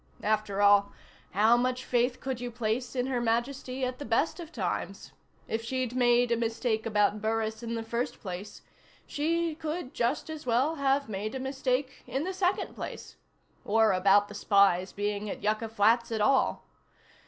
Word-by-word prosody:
After 210 -2 0
all, 200 0 +5 0.4
how 215 +5 +4
much 255 +1 0
faith 245 +1 +1
could 260 -2 -4
you 245 - -3
place 240 +2 -2
in 250 -1 0
Her 255 -2 -1
Majesty 255 +3 -1
at 255 0 -4
the - - -5
best 240 +10 0
of 335 -2 -8
times? - - -4 0.4
If 225 +1 -2
she'd 255 0 -2
made 245 -1 +3
a 235 - +3
mistake 225 -1 -1
about 210 -1 +2
Burris 220 0 -1
in 230 0 -4
the 225 - -3
first 235 +2 -3
place, 190 +1 -7 0.4
she 330 +2 0
could 310 -2 -5
just 240 +5 -1
as 315 -1 -7
well 255 +7 +1
have 280 0 +1
made 215 +2 -4
a - - -3
mistake 265 0 -2
in 270 +3 -2
the 375 +3 -3
second 370 0 0
place. - - -8 0.5
Or 220 0 +3
about 195 +2 +4
the 205 - -10
spy's 200 -3 +3
being 205 0 -3
at - - -6
Yucca 215 +2 0
Flats 225 +2 +3
at 220 - -1
all. 265 +5 +2
235 Hz, 175 wpm, -29 LUFS, 215-260 Hz, 0.5 s, all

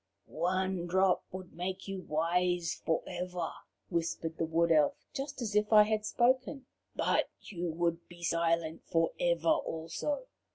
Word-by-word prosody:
"One 185 +1 -1
drop 190 +1 +3
would 185 -1 -8
make 185 +3 -4
you 195 -1 -4
wise 175 +1 0
for 160 - +1
ever," 180 -2 -3 0.4
whispered 165 -1 -2
the 165 - +2
Wood 165 +1 +2
Elf, 150 -3 +4 0.2
just 275 -2 -4
as 210 -2 -3
if 210 +1 +2
I 210 -1 +9
had 215 0 0
spoken, 260 +3 +1 0.3
"but - - +2
you 175 -3 -4
would 170 +1 -1
be 175 0 -13
silent 165 -1 +1
for 165 0 +2
ever, 170 -1 +1
also. 165 - -1
175 Hz, 150 wpm, -32 LUFS, 165-195 Hz, 0.4 s, I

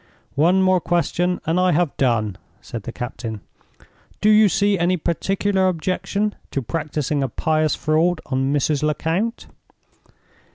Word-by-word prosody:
"One 180 +6 +3
more 185 -1 +3
question 175 +1 0
and 165 +3 +1
I 180 -1 +3
have 175 -5 +1
done," 110 -7 0 0.2
said 115 - -7
the 120 - -7
captain. 115 -3 -6 0.8
"Do 215 - +4
you 215 -1 +6
see 200 +1 +2
any 180 +2 +2
particular 190 +3 0
objection 185 +4 -1 0.2
to 135 - -3
practicing 150 +1 -2
a 135 - -1
pious 155 +4 0
fraud 160 +2 +1
on 135 0 -1
Mrs. 145 0 +1
Lecount?" 165 +9 -1
165 Hz, 135 wpm, -21 LUFS, 140-185 Hz, 0.8 s, you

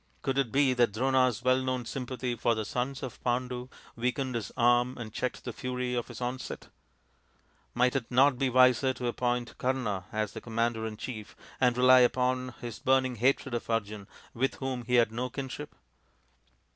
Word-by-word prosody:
Could 135 0 0
it 130 -5 0
be 135 -1 +3
that 120 -4 +2
Drona's 130 -1 +2
well 130 +1 +3
known 130 -2 -2
sympathy 125 0 -3
for 115 +1 +1
the 110 -1 -3
sons 125 +5 -3
of 130 - -7
Pandu 125 0 -2 0.3
weakened 125 +2 -1
his 115 -4 -3
arm 120 +1 +3
and 110 -3 -7
checked 125 - -3
the 120 - -5
fury 125 +1 -3
of 120 -1 -2
his - - -9
onset? 125 +1 -5 1.1
Might 125 +1 +3
it 130 -4 -2
not 130 +1 +4
be 135 -2 +2
wiser 130 +1 +4
to 125 - -5
appoint 120 0 -1
Kama 120 -8 -1
as 110 -1 -1
commander 115 -1 -1
in 110 -1 -7
chief 110 -2 -7 0.2
and 125 -2 +3
rely 130 0 +7
upon 125 0 +1
his 120 -3 -6
burning 130 -1 +2
hatred 130 +2 +1
of 120 - -3
Arjun, 105 -3 -2 0.3
with 130 +3 0
whom 130 -3 -4
he 125 - +1
had 120 -2 +4
no 125 +3 -3
kinship 135 +3 -6
125 Hz, 175 wpm, -29 LUFS, 120-130 Hz, 1.1 s, rely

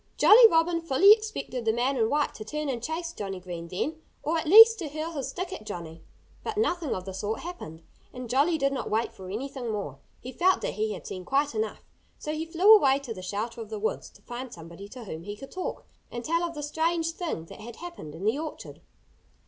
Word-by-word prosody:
Jolly 455 +2 +9
Robin 335 0 +2
fully 330 +6 +6
expected 430 - +1
the 225 - +2
man 245 +4 0
in 225 -3 +1
white 295 0 +1
to 215 - -8
turn 300 +6 -4
and 245 -3 -3
chase 330 +5 -4
Johnnie 195 - -5
Green 175 -2 -7
then 305 - -3 0.2
or 315 +3 0
at 320 - -1
least 450 +5 +9
to 330 - -4
hurl 310 +3 -4
his 275 -5 -4
stick 365 +6 -5
at 370 - -7
Johnnie. 165 -5 -7 0.4
But 435 -1 -4
nothing 350 - 0
of 185 - -6
the 190 - -6
sort 205 +3 -3
happened. 170 - -8 0.3
And 250 -1 -7
Jolly 285 +8 +2
did 275 -2 +1
not 270 - -3
wait 225 +2 0
for 185 -1 -10
anything 255 +3 -5
more. 170 -11 -5 0.2
He 255 - -8
felt 370 +6 +2
that - - -2
he 215 0 -1
had 190 - -9
seen 185 - -6
quite 280 +6 +1
enough. 220 -1 -3 0.3
So 305 - -4
he 315 +1 -4
flew 365 +7 +6
away 275 -9 +4
to 275 -5 -6
the 185 - -9
shelter 215 +5 -4
of 220 - -8
the 220 - -4
woods, 215 +1 -3
to - - -22
find 245 +1 -7
somebody 170 +3 -10
to 250 +2 -9
whom 165 -6 -7
he 205 +4 -7
could 270 - -11
talk 370 - -5 0.2
and 240 0 -6
tell 335 +2 +1
of 340 -1 -3
the 295 - -5
strange 325 +2 0
thing 330 - -4
that 165 - -12
had 235 +1 -9
happened 340 - -9
in 180 +5 -6
the 225 +7 +1
orchard. 315 -1 -7
265 Hz, 235 wpm, -27 LUFS, 210-330 Hz, 0.4 s, Jolly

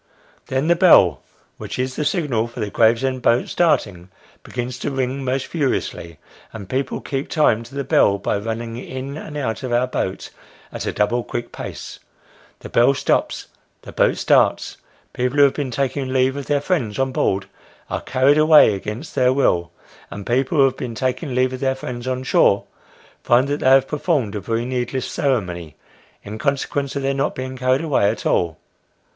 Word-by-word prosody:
Then 130 +2 -1
the 170 - +4
bell, 95 - +5 0.4
which - - -6
is 130 0 -2
the 150 - -2
signal 145 - 0
for 120 +1 -11
the 105 -2 -3
Gravesend 125 +3 +2
boat 120 0 +2
starting, 100 - 0 0.3
begins 125 0 -5
to - - -2
ring 135 0 -2
most 130 +1 -1
furiously: 130 - -3 0.3
and 100 -4 -9
people 130 +3 -2
keep 135 0 -4
time 135 -8 +2
to 120 +4 -12
the 140 - -2
bell, 100 -5 +3
by 100 +1 -1
running 115 +2 -5
in 130 +2 -6
and 150 -1 -7
out 115 -7 -3
of 130 -2 -5
our 120 +1 +2
boat 95 -6 -4 0.4
at - - -5
a - - 0
double 120 +3 0
quick 120 0 -5
pace. - - -8 0.6
The - - -9
bell 120 +4 +4
stops; - - -1 0.3
the - - -10
boat - - +2
starts: - - +2 0.4
people 125 +3 -1
who 145 - +7
have 140 - +4
been 145 -3 -3
taking 135 +2 -2
leave 130 0 +2
of 140 -1 -6
their 145 -1 +1
friends 130 - -1
on 135 0 0
board, 95 -5 0 0.4
are - - -3
carried 135 +3 +3
away 155 -7 +7
against 105 - -6
their 130 -2 +3
will; 85 -11 +1 0.4
and 100 -1 -8
people 130 +6 0
who 140 - +6
have 130 -1 +2
been 115 -2 -5
taking 130 +3 -2
leave 130 0 +1
of 130 - -5
their 130 0 0
friends 125 -1 -6
on 130 0 -2
shore, 100 -5 +3 0.6
find 125 +3 +3
that 145 +1 -1
they 130 - +3
have 135 0 +5
performed 150 - -1
a 105 - -3
very 115 +3 -2
needless 125 0 -2
ceremony, 90 - -2 0.5
in 105 +2 -7
consequence 140 0 -1
of 140 - -2
their 135 0 +1
not 140 +1 -1
being 130 0 -5
carried 130 +2 +1
away 135 -10 +2
at 105 0 -4
all. 85 -3 +1
130 Hz, 185 wpm, -20 LUFS, 115-140 Hz, 0.6 s, who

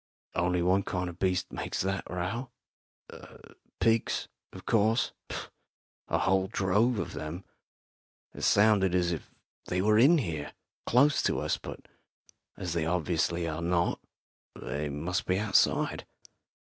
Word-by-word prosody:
"Only 90 0 +1
one 95 +2 +3
kind 90 -1 -3
of 85 0 -11
beast 90 -1 0
makes - - -4
that 95 +1 -2
row. 95 +8 -3 1.3
Pigs, 115 0 +1 0.2
of - - -11
course 110 +1 +2 1.0
a - - +1
whole 95 0 +2
drove 105 +5 +2
of 85 - -3
them. 75 +5 -6 0.9
It - - -9
sounded 100 -3 +4
as 90 -1 +2
if 80 - -5 0.4
they 90 - -1
were 105 +3 +4
in 150 +8 +7
here, 80 - -3 0.3
close 140 +4 +4
to - - +1
us. - - 0
But - - -9 0.7
as 90 -3 -3
they 80 -2 0
obviously 85 0 0
are 80 +1 -3
not, 85 0 +1 0.6
they 75 +1 -4
must 80 +6 -2
be 95 - +2
outside." 105 0 +2
90 Hz, 130 wpm, -29 LUFS, 85-105 Hz, 1.3 s, in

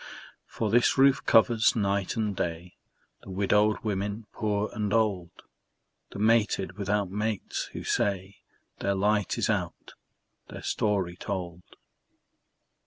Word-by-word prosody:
For 110 -3 -3
this 120 +3 +3
roof 135 0 +4
covers, 115 0 +4
night 100 -3 0
and 105 -3 -1
day, 85 0 -4 0.5
The - - -13
widowed 105 +2 +2
women 105 +1 -3
poor 105 -1 -1
and 105 -2 -2
old, 105 -6 +1 0.8
The - - -9
mated 105 -3 +2
without 100 -1 -1
mates, 105 0 -2
who - - -6
say 100 -1 -1 0.4
Their 100 0 0
light 105 0 +1
is - - 0
out, - - -3 0.6
their - - -9
story 95 -5 0
told. 90 -4 -5
105 Hz, 120 wpm, -27 LUFS, 95-110 Hz, 0.8 s, roof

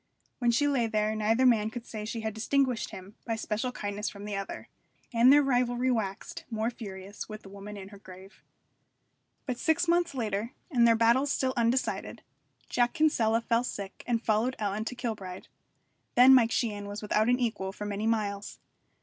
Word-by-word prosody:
When 240 -2 +2
she 260 +5 +3
lay 260 -5 +1
there 215 0 0
neither 225 +4 +2
man 220 -4 +4
could 235 +1 -7
say 215 -3 -6
she 225 +1 -4
had 220 -1 -3
distinguished 250 +2 0
him 190 +2 -10
by 230 - -2
special 220 +3 -2
kindness 205 -2 -3
from 200 0 -10
the 210 -1 -4
other. 195 0 -5 0.5
And 235 +3 +6
their 290 +1 +7
rivalry 250 -1 +1
waxed 210 -4 -3
more 225 0 -1
furious 200 -3 -8
with 215 0 -8
the 195 - -12
woman 200 +1 -9
in 195 -1 -9
her 200 -1 -13
grave. 190 +1 -14 1.0
But 250 -3 -3
six 335 +2 +2
months 340 -3 +2
later, 220 -1 -2 0.2
and 240 -4 +5
their 230 - +5
battles 235 +5 +3
still 260 -1 0
undecided, 240 +2 -1 0.4
Jack 240 0 +1
Kinsella 230 -8 +2
fell 230 +1 +1
sick 200 -5 -6
and 235 -1 0
followed 225 +4 +1
Ellen 210 +1 -2
to 250 - -4
Kilbride. 210 -7 -5 0.7
Then 255 +2 +8
Mike 240 -3 +6
Sheehan 205 -4 -1
was 205 +1 -6
without 215 +2 +2
an 245 +1 +3
equal 220 -6 -1
for 210 +1 -7
many 205 +1 -2
miles. 210 -2 -1
225 Hz, 185 wpm, -29 LUFS, 210-245 Hz, 1.0 s, Then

